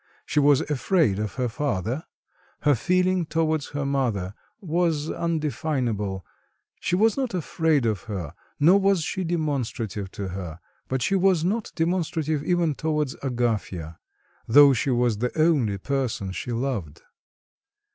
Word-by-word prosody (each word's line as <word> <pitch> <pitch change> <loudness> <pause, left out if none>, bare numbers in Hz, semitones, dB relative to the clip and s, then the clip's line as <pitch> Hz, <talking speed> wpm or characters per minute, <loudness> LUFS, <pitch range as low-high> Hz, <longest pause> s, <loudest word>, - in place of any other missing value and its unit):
She - - +1
was 145 -1 +5
afraid 150 - +1
of 105 -1 -3
her 130 -2 0
father; 120 - -2 0.6
her 145 - +4
feeling 180 - +2
towards 160 -2 0
her 145 -1 -3
mother 120 -9 -1 0.3
was 165 -4 0
undefinable, 130 - -2 0.5
she 180 - 0
was 220 +3 +3
not 260 -7 -1
afraid 160 -5 +1
of 105 -5 0
her, 95 -9 -5 0.3
nor 175 +7 +6
was 195 -4 +2
she 190 - -2
demonstrative 135 - -2
to 100 -2 -4
her; 90 -3 -6 0.3
but 130 -1 -1
she - - +1
was 190 -3 +3
not 210 +4 -1
demonstrative 160 -3 0
even 170 -2 +1
towards 150 -2 -1
Agafya, 110 - -2 0.5
though 140 +4 +8
she 135 +3 0
was 120 -4 +1
the 125 +6 -2
only 140 -11 +3
person 125 -4 -2
she 95 +7 -5
loved. 115 - -3
140 Hz, 135 wpm, -25 LUFS, 110-165 Hz, 0.6 s, though